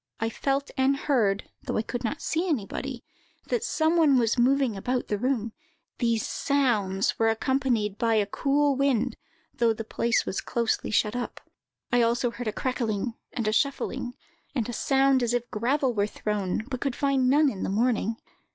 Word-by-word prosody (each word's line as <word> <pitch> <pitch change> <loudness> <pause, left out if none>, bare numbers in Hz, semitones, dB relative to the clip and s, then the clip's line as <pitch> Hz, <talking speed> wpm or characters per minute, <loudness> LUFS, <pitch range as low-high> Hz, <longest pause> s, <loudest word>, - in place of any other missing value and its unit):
I 225 0 -1
felt 275 +3 -1
and 270 +1 +3
heard, 220 -9 +1
though - - -3
I 220 - +1
could 245 +2 -5
not 280 +6 -3
see 340 +3 0
anybody, 260 -1 -3 0.5
that 475 -2 0
some 320 -6 +1
one 295 -5 +5
was 230 -2 +2
moving 260 -1 +2
about 245 +6 -2
the 210 - 0
room; 235 -3 -1 0.5
these 230 -3 +1
sounds 215 -9 +1
were 225 0 +4
accompanied 225 -3 0
by 230 -1 +2
a 210 -2 +3
cool 280 +6 +1
wind, 260 -3 +1 0.4
though 230 -1 +2
the 225 - -5
place 235 +1 0
was 190 - -2
closely 235 -2 -1
shut 210 +1 +1
up. 245 - -4 0.5
I 245 - +3
heard 235 - +5
also 240 +1 +1
a 235 -2 -3
crackling, 235 -3 -2 0.2
and 230 -4 -2
a 215 - +1
shuffling, 255 -1 -1 0.4
and 235 -5 0
a 240 - -4
sound 270 +2 +3
as 240 0 +1
if 240 0 -2
gravel 255 +4 +1
were 205 -2 +1
thrown; 210 -2 -2
but 255 -2 -5
could 275 -3 -1
find 270 -2 +2
none 295 +3 +5
in 195 - -7
the - - -1
morning. 225 +1 +1
245 Hz, 180 wpm, -27 LUFS, 220-270 Hz, 0.5 s, one